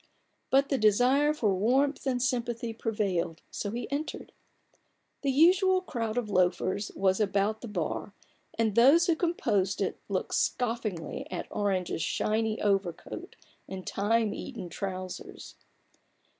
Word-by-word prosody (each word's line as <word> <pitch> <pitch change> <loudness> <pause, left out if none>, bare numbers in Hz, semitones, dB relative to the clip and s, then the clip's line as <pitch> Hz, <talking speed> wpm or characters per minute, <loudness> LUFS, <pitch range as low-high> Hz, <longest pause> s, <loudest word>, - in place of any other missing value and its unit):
But 275 +1 +3
the 275 - +1
desire 250 +8 +4
for 225 -10 +1
warmth 265 +9 +1
and 255 -2 +1
sympathy 240 -2 -1
prevailed, 195 -7 -2
so 205 - -3
he 235 +4 -4
entered. 290 +3 -4 0.9
The 280 - 0
usual 370 +6 +5
crowd 230 -8 -3
of 240 -3 0
loafers 185 +1 +1
was 190 0 +2
about 205 +1 +1
the 240 - -6
bar, 200 +1 -3 0.4
and 225 -2 +1
those 275 +10 +6
who 335 - +3
composed 210 - 0
it - - -2
looked - - -2
scoffingly 225 -8 -1
at 180 - -4
Orange's 190 -5 -1
shiny 220 +4 0
overcoat 200 - -2 0.3
and 190 -1 -6
time 215 +1 +1
eaten 175 - -7
trousers. 185 +1 -6
220 Hz, 130 wpm, -29 LUFS, 195-260 Hz, 0.9 s, those